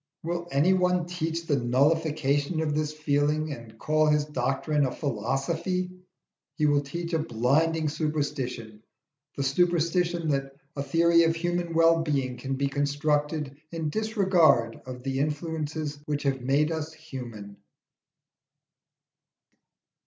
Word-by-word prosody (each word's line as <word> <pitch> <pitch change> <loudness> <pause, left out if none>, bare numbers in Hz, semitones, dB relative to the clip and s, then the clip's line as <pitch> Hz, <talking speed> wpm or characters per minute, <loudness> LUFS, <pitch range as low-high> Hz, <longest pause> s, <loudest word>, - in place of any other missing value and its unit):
Will 170 +1 -3
any 155 +6 +3
one 180 -1 +2
teach 165 -1 -3
the 145 -4 +1
nullification 145 +3 +1
of 155 -2 0
this 150 0 0
feeling 150 0 0
and 115 -3 -11
call 155 +4 +2
his 150 -1 +3
doctrine 145 +2 0
a - - -3
philosophy? 155 - -2 0.6
He 155 - +1
will 145 -1 +3
teach 170 +4 -5
a 165 - +2
blinding 155 +5 +1
superstition 140 -8 -3 0.6
the 140 - 0
superstition 170 +2 +1
that 135 -1 -1 0.2
a 140 - -2
theory 170 +3 +4
of 165 0 +3
human 175 0 -2
wellbeing 160 -6 +2
can 135 +2 -3
be 140 +1 0
constructed 145 +1 -1 0.2
in 160 -3 -3
disregard 180 - +3
of 125 -1 -7
the 135 0 -2
influences 150 0 -3
which 145 -1 -2
have 135 -2 0
made 140 +5 +2
us 160 0 -3
human. 120 -10 -9
150 Hz, 125 wpm, -27 LUFS, 135-165 Hz, 0.6 s, theory